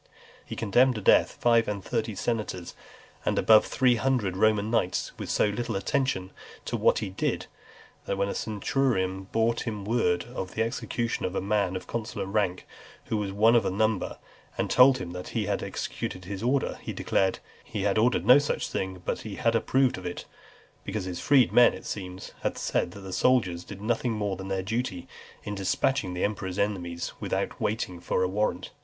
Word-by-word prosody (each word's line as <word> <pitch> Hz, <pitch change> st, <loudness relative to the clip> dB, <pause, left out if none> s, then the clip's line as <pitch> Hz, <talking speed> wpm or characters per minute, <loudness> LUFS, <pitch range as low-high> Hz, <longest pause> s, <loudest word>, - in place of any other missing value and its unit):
He -, -, -7 dB
condemned 125 Hz, +4 st, +3 dB
to 105 Hz, -, -4 dB
death -, -, +4 dB
five 115 Hz, -1 st, +4 dB
and 100 Hz, -2 st, -3 dB
thirty 115 Hz, -2 st, -2 dB
senators, 105 Hz, -6 st, -3 dB, 0.5 s
and -, -, 0 dB
above 110 Hz, -1 st, +6 dB
three 125 Hz, -2 st, +3 dB
hundred 120 Hz, -8 st, 0 dB
Roman 110 Hz, +1 st, +2 dB
knights, 100 Hz, -6 st, 0 dB
with -, -, -5 dB
so -, -, +3 dB
little 115 Hz, +2 st, -3 dB
attention 95 Hz, -3 st, -1 dB, 0.3 s
to -, -, -2 dB
what -, -, +3 dB
he 105 Hz, -3 st, -3 dB
did, 95 Hz, -, -1 dB, 0.6 s
that 100 Hz, -, -1 dB
when 100 Hz, 0 st, +1 dB
a -, -, -2 dB
centurion 100 Hz, -4 st, -1 dB
brought 115 Hz, +2 st, +1 dB
him 105 Hz, -3 st, -4 dB
word 105 Hz, -6 st, +1 dB
of 95 Hz, -7 st, -5 dB
the 115 Hz, -, +2 dB
execution 115 Hz, 0 st, -2 dB
of 90 Hz, -, -2 dB
a -, -, +1 dB
man 100 Hz, -1 st, 0 dB
of 95 Hz, -, -5 dB
consular 115 Hz, -3 st, -4 dB
rank, 95 Hz, -2 st, -1 dB, 0.4 s
who 110 Hz, -, -1 dB
was 100 Hz, -2 st, -2 dB
one 110 Hz, +4 st, +4 dB
of 120 Hz, -, +6 dB
the -, -, -1 dB
number, 110 Hz, +1 st, 0 dB, 0.4 s
and -, -, -1 dB
told 130 Hz, +1 st, +7 dB
him 85 Hz, -9 st, -6 dB
that 90 Hz, 0 st, -7 dB
he -, -, 0 dB
had -, -, -1 dB
executed 90 Hz, 0 st, -5 dB
his 95 Hz, +1 st, -5 dB
order, 130 Hz, +4 st, 0 dB
he -, -, -5 dB
declared, 95 Hz, -1 st, +1 dB, 0.3 s
"he 105 Hz, -3 st, -4 dB
had 100 Hz, +1 st, +2 dB
ordered 120 Hz, +3 st, +2 dB
no 130 Hz, +3 st, +8 dB
such 145 Hz, -, -2 dB
thing, 95 Hz, -1 st, -4 dB
but -, -, -1 dB
that 110 Hz, -, -8 dB
he 100 Hz, -, -7 dB
approved 120 Hz, +1 st, +2 dB
of 90 Hz, -, -11 dB
it;" 90 Hz, -, -6 dB, 0.6 s
because 100 Hz, -1 st, -3 dB
his 90 Hz, -1 st, -4 dB
freedmen, 125 Hz, -3 st, +5 dB
it -, -, -11 dB
seems, 95 Hz, -2 st, -6 dB
had -, -, -2 dB
said, -, -, 0 dB
that 100 Hz, -, -10 dB
the 95 Hz, -1 st, -7 dB
soldiers 95 Hz, -10 st, +2 dB
did 100 Hz, -, -9 dB
nothing 120 Hz, +1 st, 0 dB
more 105 Hz, -3 st, -1 dB
than 95 Hz, +1 st, -7 dB
their 95 Hz, -1 st, -1 dB
duty, 110 Hz, -3 st, -3 dB, 0.4 s
in 105 Hz, -, -4 dB
dispatching 95 Hz, 0 st, 0 dB
the 90 Hz, -, -2 dB
emperor's 95 Hz, -3 st, -2 dB
enemies 90 Hz, -5 st, -2 dB
without -, -, -2 dB
waiting 105 Hz, -5 st, -2 dB
for 90 Hz, +1 st, 0 dB
a -, -, +2 dB
warrant. 95 Hz, -2 st, -1 dB
105 Hz, 195 wpm, -27 LUFS, 95-115 Hz, 0.6 s, no